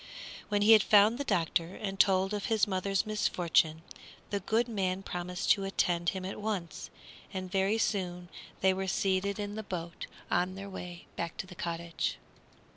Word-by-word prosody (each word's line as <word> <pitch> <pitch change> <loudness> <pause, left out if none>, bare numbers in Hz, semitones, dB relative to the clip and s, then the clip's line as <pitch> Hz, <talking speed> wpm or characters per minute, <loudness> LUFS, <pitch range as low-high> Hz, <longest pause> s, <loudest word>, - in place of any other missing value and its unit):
When 205 -1 +2
he 215 - +6
had 220 -2 +9
found 210 +5 +5
the - - 0
doctor 175 - 0
and 195 -2 -5
told 195 0 +4
of 205 -1 -2
his 220 -3 +3
mother's 195 0 0
misfortune, 170 -6 +1 0.5
the 200 - 0
good 225 +5 +1
man 195 -4 -1
promised 180 -1 -2
to 195 - +3
attend 175 -3 +1
him 190 -1 -4
at 195 +2 -5
once, 200 -6 -3 0.4
and 185 -2 -5
very 195 +2 +2
soon 180 -5 -1 0.3
they 190 0 +4
were 190 0 -3
seated 190 +1 0
in 205 -1 -4
the 220 - -4
boat 175 -4 -6 0.2
and 180 +1 +2
on 185 - -9
their 195 0 -7
way 175 -2 -8 0.3
to - - -4
the 185 - -11
cottage. 170 -1 -3
190 Hz, 175 wpm, -31 LUFS, 180-205 Hz, 0.5 s, had